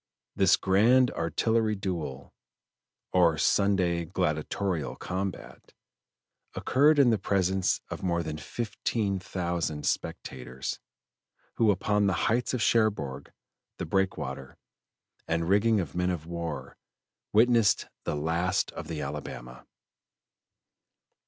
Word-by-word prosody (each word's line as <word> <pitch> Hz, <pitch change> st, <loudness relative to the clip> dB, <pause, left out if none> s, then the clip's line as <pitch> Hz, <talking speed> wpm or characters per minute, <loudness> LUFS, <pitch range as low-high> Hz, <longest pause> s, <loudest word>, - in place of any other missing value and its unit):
This -, -, +5 dB
grand 120 Hz, +7 st, +4 dB
artillery 110 Hz, +6 st, 0 dB
duel, 85 Hz, -9 st, -5 dB, 0.8 s
or 85 Hz, -3 st, +4 dB
Sunday 90 Hz, 0 st, +2 dB
gladiatorial 85 Hz, 0 st, -2 dB
combat, 95 Hz, +1 st, -5 dB, 0.8 s
occurred 145 Hz, +4 st, +3 dB
in 135 Hz, -4 st, +6 dB
the 110 Hz, -, +1 dB
presence 95 Hz, -1 st, +1 dB
of -, -, -5 dB
more 85 Hz, -2 st, 0 dB
than 75 Hz, -1 st, -5 dB
fifteen 105 Hz, 0 st, -2 dB
thousand 85 Hz, -5 st, -3 dB
spectators, 65 Hz, +1 st, -4 dB, 0.8 s
who 115 Hz, -, +4 dB
upon 105 Hz, +1 st, +2 dB
the 95 Hz, -, +2 dB
heights 120 Hz, +2 st, +1 dB
of 120 Hz, -, -1 dB
Cherbourg, 100 Hz, -, +1 dB, 0.5 s
the -, -, -4 dB
breakwater, 95 Hz, -8 st, -2 dB, 0.7 s
and 85 Hz, 0 st, 0 dB
rigging 105 Hz, +3 st, +3 dB
of 80 Hz, -7 st, -4 dB
men 90 Hz, +1 st, 0 dB
of 85 Hz, -4 st, -3 dB
war, 85 Hz, 0 st, -5 dB, 0.5 s
witnessed 115 Hz, -1 st, +4 dB, 0.2 s
"the -, -, -2 dB
last 85 Hz, +5 st, 0 dB
of -, -, -8 dB
the 80 Hz, -3 st, -4 dB
Alabama." 65 Hz, -3 st, -7 dB
90 Hz, 105 wpm, -28 LUFS, 80-105 Hz, 0.8 s, in